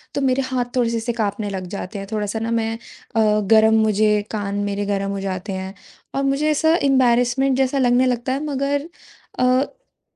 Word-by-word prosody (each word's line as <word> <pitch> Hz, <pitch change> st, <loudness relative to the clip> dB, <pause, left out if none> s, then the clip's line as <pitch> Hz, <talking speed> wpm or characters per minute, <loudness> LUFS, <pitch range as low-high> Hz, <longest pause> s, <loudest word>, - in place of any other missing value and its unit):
तो 280 Hz, -, 0 dB
मेरे 265 Hz, 0 st, +2 dB
हाथ 255 Hz, -2 st, -1 dB
थोड़े 245 Hz, -2 st, +2 dB
से 230 Hz, -, -1 dB
ऐसे 230 Hz, +1 st, -2 dB
काँपने 210 Hz, -2 st, -2 dB
लग 190 Hz, -2 st, -5 dB
जाते 200 Hz, +1 st, -6 dB
हैं, 195 Hz, -, -7 dB
थोड़ा-सा 210 Hz, 0 st, -2 dB
न 225 Hz, +1 st, -2 dB
मैं 225 Hz, -1 st, 0 dB, 0.4 s
अ, 215 Hz, -1 st, +3 dB
गर्म 220 Hz, 0 st, +6 dB
मुझे 210 Hz, 0 st, +2 dB
कान 205 Hz, -2 st, -3 dB
मेरे 205 Hz, 0 st, -2 dB
गरम 200 Hz, -1 st, -1 dB
हो 200 Hz, -, -3 dB
जाते 195 Hz, +1 st, -4 dB
हैं 190 Hz, 0 st, -5 dB, 0.4 s
और 275 Hz, -, 0 dB
मुझे 275 Hz, +3 st, +1 dB
ऐसा 320 Hz, +2 st, +3 dB
इम्बेरसमेंट 260 Hz, 0 st, +3 dB
जैसा 265 Hz, +1 st, +1 dB
लगने 250 Hz, -1 st, +3 dB
लगता 245 Hz, +1 st, -1 dB
है 275 Hz, +3 st, -3 dB
मगर 285 Hz, +1 st, -1 dB, 0.5 s
अ, -, -, +2 dB
ब 265 Hz, -, -1 dB
230 Hz, 195 wpm, -21 LUFS, 205-265 Hz, 0.5 s, गर्म